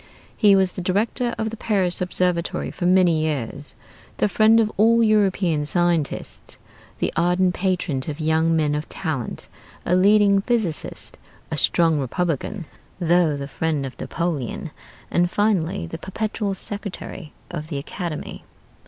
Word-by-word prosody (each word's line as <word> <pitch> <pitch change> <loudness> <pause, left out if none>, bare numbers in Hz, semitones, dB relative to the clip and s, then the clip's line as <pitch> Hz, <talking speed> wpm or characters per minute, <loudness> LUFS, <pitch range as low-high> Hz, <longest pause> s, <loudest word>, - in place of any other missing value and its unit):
He 205 -3 +5
was 190 -1 +3
the 185 - -6
Director 220 +6 0
of 220 0 -2
the 225 - -7
Paris 190 -6 0
Observatory 180 -1 -1
for 175 - -2
many 180 -3 +4
years; 145 -2 -3 0.4
the - - +2
friend 220 +2 +5
of 215 -1 +2
all 230 +3 +4
European 195 -7 +2
scientists; 170 -1 0 0.4
the - - -1
ardent 180 +2 +2
patron 180 -8 -1
of 150 0 -4
young 160 +1 +2
men 150 -2 +1
of 150 +1 -3
talent; 155 -9 -4 0.4
a 180 - +2
leading 200 +1 +5
physicist; 210 -8 -2 0.3
a - - -1
strong 165 -3 +3
Republican, 165 - -2 0.3
though 170 -3 +3
the 140 0 -5
friend 150 0 -2
of 130 - -8
Napoleon; 160 -8 -3 0.4
and 175 0 +2
finally 195 -3 0
the 165 0 -7
Perpetual 205 +2 -3
Secretary 195 -5 -5 0.2
of 155 -3 -5
the 155 -3 -4
Academy. 165 +3 -6
175 Hz, 140 wpm, -22 LUFS, 160-200 Hz, 0.4 s, He